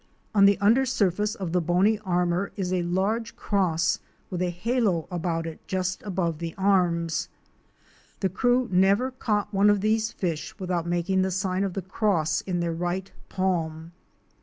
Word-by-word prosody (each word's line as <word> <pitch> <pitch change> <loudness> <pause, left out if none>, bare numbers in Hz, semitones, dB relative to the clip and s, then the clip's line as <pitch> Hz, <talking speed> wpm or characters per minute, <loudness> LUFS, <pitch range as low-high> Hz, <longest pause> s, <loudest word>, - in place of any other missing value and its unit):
On 200 -2 +6
the 200 0 +5
under 220 +7 +4
surface 210 -4 0
of 185 -6 -4
the 180 +1 +2
bony 185 +6 +2
armor 180 -1 0
is 185 -3 -2
a 180 - +1
large 195 +6 -1
cross 170 -5 +1 0.3
with 180 -1 -3
a 180 - +1
halo 195 -2 0
about 165 -1 -2
it 165 -1 -6
just 185 0 -2
above 175 -5 -2
the 165 -1 -5
arms. 175 -4 +1 0.9
The 195 - +3
crew 245 +6 +2
never 195 +8 +3
caught 215 -5 -1
one 200 +1 +4
of 205 -1 +3
these 220 +2 +1
fish 170 -8 -4
without 180 -3 -2
making 175 +2 +1
the 190 - +1
sign 190 0 -1
of 195 -2 -2
the 195 - -3
cross 175 -5 0
in, 180 -2 -2
their 170 -1 -1
right 175 +3 -3 0.2
palm. 165 -4 -2
185 Hz, 165 wpm, -26 LUFS, 175-205 Hz, 0.9 s, On